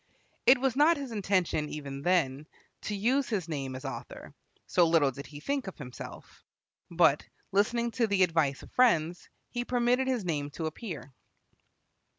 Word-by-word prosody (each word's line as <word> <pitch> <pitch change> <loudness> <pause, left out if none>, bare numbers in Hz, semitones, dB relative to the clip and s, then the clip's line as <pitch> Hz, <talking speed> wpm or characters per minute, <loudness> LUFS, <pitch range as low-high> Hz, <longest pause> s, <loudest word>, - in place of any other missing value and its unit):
It 260 - +8
was 265 0 0
not 305 +4 +5
his 275 -3 -6
intention, 185 -7 0
even 140 -2 -6
then, 155 -4 +1 0.4
to 210 - -2
use 250 +7 +1
his 195 -7 -1
name 135 -5 -4
as 130 +2 -8
author, 135 - -7 0.3
so 175 -2 +3
little 160 -4 +4
did 140 +2 -9
he 145 0 -10
think 275 - -2
of 190 - -7
himself. 125 -4 -10 0.5
But, 170 -4 +4 0.3
listening 235 +4 +1
to 235 -1 +1
the 200 -2 +3
advice 160 -6 +1
of - - -14
friends, 175 -9 +2 0.2
he 245 0 -2
permitted 245 +1 +1
his 250 -7 0
name 145 -4 -1
to 160 - -2
appear. 160 - -6
180 Hz, 165 wpm, -29 LUFS, 150-240 Hz, 0.5 s, It